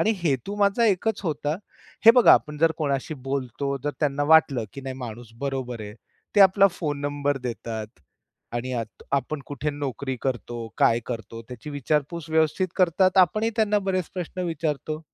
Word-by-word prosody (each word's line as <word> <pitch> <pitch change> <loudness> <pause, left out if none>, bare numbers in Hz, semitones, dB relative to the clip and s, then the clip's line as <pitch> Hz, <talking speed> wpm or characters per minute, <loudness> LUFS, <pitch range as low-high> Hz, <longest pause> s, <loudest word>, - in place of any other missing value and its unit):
आणि 220 - +3
हेतू 160 +5 -1
माझा 205 +3 +3
एकच 215 +1 +1
होता. 150 -2 -1 0.5
हे - - +13
बघा 245 - +8
आपण 150 0 -2
जर 165 +1 +4
कोणाशी 140 0 -1
बोलतो, 140 +1 -2
जर 145 - +1
त्यांना 145 -1 +1
वाटलं, 145 -6 +5
की 140 - -6
नाही 135 -1 -5
माणूस 115 -2 -8
बरोबर 130 -4 -3
आहे. 105 0 -8 0.4
ते - - +7
आपला 195 +1 +7
फोन 150 -5 -3
नंबर 145 0 -1
देतात 110 -1 -6 0.5
आणि 120 +2 -3
यात 115 -3 -5
आपण 140 +2 -1
कुठे 145 +1 -3
नोकरी 140 -2 -4
करतो, 120 -3 -3
काय 115 +1 +4
करतो 115 -1 -6
त्याची 125 +3 -8
विचारपूस 150 +3 -2
व्यवस्थित 160 +4 +2
करतात. 185 +1 +3
आपणही 215 +5 +4
त्यांना 210 -1 +3
बरेच 185 -3 -1
प्रश्न 180 0 -4
विचारतो. 155 -1 -3
145 Hz, 165 wpm, -25 LUFS, 130-170 Hz, 0.5 s, हे